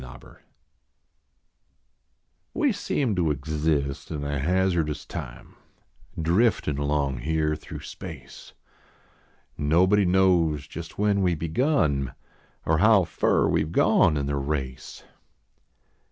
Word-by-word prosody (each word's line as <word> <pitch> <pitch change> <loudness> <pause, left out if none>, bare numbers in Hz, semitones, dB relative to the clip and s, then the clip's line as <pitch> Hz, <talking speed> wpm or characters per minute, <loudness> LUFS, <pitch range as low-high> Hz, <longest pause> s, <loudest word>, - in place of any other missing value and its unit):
EVOLUTION - - -13 2.2
\Ve 295 -5 +2
seem 135 - -1
to 85 -3 +1
exist 75 -1 -2
in 75 -3 -4
a 70 0 -2
hazardous 85 -1 0
time, - - -8 0.6
Driftin 85 - +1
along 70 -3 -1
here 75 +2 0
through 75 - -9
space; - - -10 1.1
Nobody 95 +7 +3
knows 90 -5 +2
just 85 +2 -9
when 100 -1 +1
we 90 -2 +2
begun 80 - 0 0.5
Or 80 -1 +2
how 105 -1 +5
fur - - +1
we 80 - +1
ve 75 - -3
gone 75 - +3
in 70 - -1
the 70 0 -2
race. 70 -2 -4
80 Hz, 110 wpm, -25 LUFS, 70-95 Hz, 2.2 s, how